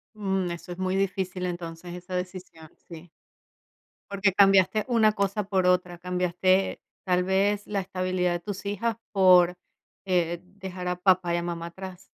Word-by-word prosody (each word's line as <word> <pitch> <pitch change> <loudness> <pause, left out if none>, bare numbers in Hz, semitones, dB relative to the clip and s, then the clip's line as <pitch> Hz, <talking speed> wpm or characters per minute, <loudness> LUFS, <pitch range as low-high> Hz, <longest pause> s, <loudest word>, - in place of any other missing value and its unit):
Mm, 190 -3 -1
eso 170 +1 -8
es 175 - -6
muy 185 0 -1
difícil, 185 -1 -1
entonces, 175 0 -6
esa 180 +1 -7
decisión, 180 -3 -7 0.2
sí. 170 0 -11 1.0
Porque 195 -1 +1
cambiaste 195 +1 +4
una 225 -3 +4
cosa 200 0 -1
por 190 -2 +1
otra, 180 -1 +1
cambiaste, 180 +1 +1 0.2
tal 180 -1 +2
vez, 200 +2 +1
la 205 -1 -1
estabilidad 185 -1 -1
de 175 - -1
tus 200 +2 -7
hijas 220 +3 -1 0.2
por, 180 -2 +6 0.5
eh, 175 -2 0
dejar 185 -1 -8
a 180 - 0
papá 180 -1 +2
y - - +1
a 170 - -2
mamá 170 -1 -4
atrás. 190 +1 -10
185 Hz, 155 wpm, -26 LUFS, 180-195 Hz, 1.0 s, por